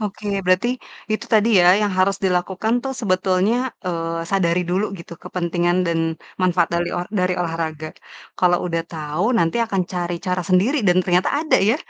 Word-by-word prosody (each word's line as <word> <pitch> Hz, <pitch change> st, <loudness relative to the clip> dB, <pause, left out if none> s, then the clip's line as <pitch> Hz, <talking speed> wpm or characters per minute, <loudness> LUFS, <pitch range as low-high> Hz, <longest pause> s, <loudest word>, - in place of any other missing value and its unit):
Oke, 210 Hz, 0 st, -5 dB, 0.2 s
berarti 185 Hz, +6 st, +2 dB, 0.4 s
itu 215 Hz, -, -2 dB
tadi 220 Hz, 0 st, +4 dB
ya -, -, +4 dB, 0.2 s
yang 205 Hz, -2 st, 0 dB
harus 190 Hz, +1 st, +3 dB
dilakukan 190 Hz, +4 st, 0 dB
tuh 270 Hz, -, -3 dB
sebetulnya, 185 Hz, 0 st, +1 dB, 0.3 s
eee, 165 Hz, -1 st, -2 dB
sadari 180 Hz, -3 st, +2 dB
dulu 190 Hz, +3 st, +1 dB
gitu 170 Hz, -, -11 dB
kepentingan 175 Hz, 0 st, 0 dB
dan 170 Hz, -1 st, 0 dB, 0.4 s
manfaat 175 Hz, -2 st, +2 dB
dali 170 Hz, 0 st, 0 dB
or 175 Hz, -, -2 dB, 0.2 s
dari 180 Hz, 0 st, +1 dB
olahraga. 160 Hz, -2 st, -3 dB, 0.5 s
Kalo 180 Hz, -1 st, +4 dB
udah 165 Hz, -1 st, -1 dB
tau, 155 Hz, +2 st, -3 dB
nanti 165 Hz, +1 st, +1 dB
akan 195 Hz, -4 st, -1 dB
cari 175 Hz, -1 st, -2 dB
cara 180 Hz, 0 st, 0 dB
sendiri 190 Hz, +10 st, +3 dB
dan 180 Hz, -, +4 dB
ternyata 180 Hz, 0 st, +2 dB
ada 315 Hz, -, +2 dB
ya, 230 Hz, -, +3 dB
180 Hz, 165 wpm, -21 LUFS, 170-195 Hz, 0.5 s, tadi